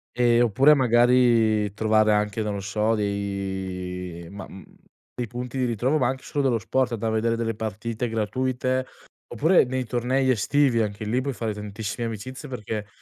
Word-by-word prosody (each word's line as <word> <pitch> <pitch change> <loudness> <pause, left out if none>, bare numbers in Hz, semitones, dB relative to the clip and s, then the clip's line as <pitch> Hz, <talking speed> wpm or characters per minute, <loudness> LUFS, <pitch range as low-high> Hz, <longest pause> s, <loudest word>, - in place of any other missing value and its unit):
Ehm, 120 -1 +4
oppure 130 +6 +5
magari 120 -5 +3
trovare 110 0 +3
anche, 105 +1 0
non 105 -1 -2
lo - - -3
so, 105 +3 0
dei 95 -4 -4
ma, 100 +2 -8
mhmm, 95 - -12 0.5
dei 125 - -2
punti 125 +3 -6
di 130 - +1
ritrovo, 125 +5 +1
ma 125 - +2
anche 130 +1 -3
solo 145 - -2
dello 125 -4 +2
sport, 125 +2 0
da 115 0 -2
vedere 115 +1 0
delle 115 -1 -2
partite 110 +2 -4
gratuite, 130 +4 -1 0.5
oppure 160 +10 +4
nei 130 0 -2
tornei 125 +3 0
estivi 130 +1 +2
anche 105 0 -3
lì 120 +5 0
puoi 140 +1 -3
fare 115 -3 -3
tantissime 105 +2 -5
amicizie 130 +6 -7
perché 105 -4 -5
115 Hz, 165 wpm, -24 LUFS, 105-125 Hz, 0.5 s, oppure